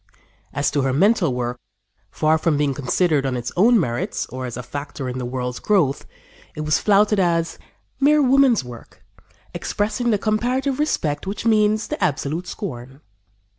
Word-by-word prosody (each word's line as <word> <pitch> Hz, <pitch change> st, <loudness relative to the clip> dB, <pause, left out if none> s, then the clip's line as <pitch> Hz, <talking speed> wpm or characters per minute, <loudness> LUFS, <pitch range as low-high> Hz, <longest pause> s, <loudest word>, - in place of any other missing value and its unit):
" -, -, -37 dB
As 145 Hz, -, 0 dB
to 145 Hz, -, +1 dB
her 135 Hz, -1 st, 0 dB
mental 190 Hz, -, +3 dB
work, 125 Hz, 0 st, -3 dB, 0.5 s
far 155 Hz, +7 st, +1 dB
from 160 Hz, -3 st, +1 dB
being 145 Hz, -2 st, +1 dB
considered 145 Hz, +3 st, +1 dB
on 130 Hz, -2 st, -1 dB
its 120 Hz, 0 st, -4 dB
own 230 Hz, +5 st, +5 dB
merits 120 Hz, -8 st, -2 dB
or 130 Hz, 0 st, -5 dB
as 120 Hz, -, -7 dB
a 125 Hz, -, -5 dB
factor 140 Hz, 0 st, -6 dB
in 125 Hz, +1 st, -4 dB
the 125 Hz, -, -3 dB
world's 125 Hz, 0 st, -4 dB
growth, 170 Hz, -10 st, +1 dB, 0.5 s
it 155 Hz, -, -5 dB
was 155 Hz, 0 st, +1 dB
flouted 210 Hz, 0 st, +3 dB
as 170 Hz, -2 st, 0 dB, 0.4 s
"Mere 295 Hz, +1 st, +4 dB
woman's 265 Hz, -, +4 dB
work 120 Hz, -2 st, -13 dB, 0.5 s
Expressing 220 Hz, +4 st, -2 dB
the 215 Hz, -, +3 dB
comparative 250 Hz, +6 st, -1 dB
respect 160 Hz, -, -1 dB
Which 200 Hz, +3 st, -4 dB
means 215 Hz, -1 st, +3 dB
the -, -, -3 dB
absolute 160 Hz, +1 st, -1 dB
scorn." 135 Hz, -, -7 dB
160 Hz, 170 wpm, -21 LUFS, 130-215 Hz, 0.5 s, own